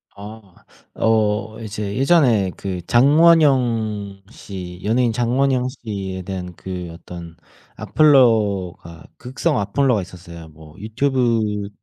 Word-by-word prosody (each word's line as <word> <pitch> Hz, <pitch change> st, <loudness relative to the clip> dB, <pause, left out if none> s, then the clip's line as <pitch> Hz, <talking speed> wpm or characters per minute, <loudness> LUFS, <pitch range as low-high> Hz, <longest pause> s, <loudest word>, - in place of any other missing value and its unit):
아. 100 Hz, -2 st, -13 dB, 0.3 s
어 110 Hz, 0 st, 0 dB
이제 105 Hz, -2 st, -5 dB
예전에 130 Hz, -, +3 dB
그 95 Hz, -3 st, -5 dB
장원영 120 Hz, -8 st, +3 dB
씨 90 Hz, -5 st, -9 dB
연예인 115 Hz, +2 st, +1 dB
장원영 125 Hz, +2 st, +1 dB
씨에 100 Hz, -7 st, -6 dB
대한 90 Hz, -2 st, -6 dB
그 90 Hz, -2 st, -7 dB
어떤 85 Hz, 0 st, -11 dB, 0.4 s
악플러가 105 Hz, -, +2 dB
극성 130 Hz, +2 st, -2 dB
악플러가 110 Hz, +2 st, +1 dB
있었어요. 85 Hz, -2 st, -11 dB
뭐 80 Hz, 0 st, -16 dB
유튜브 110 Hz, -3 st, -1 dB
105 Hz, 220 characters per minute, -20 LUFS, 95-125 Hz, 0.4 s, 예전에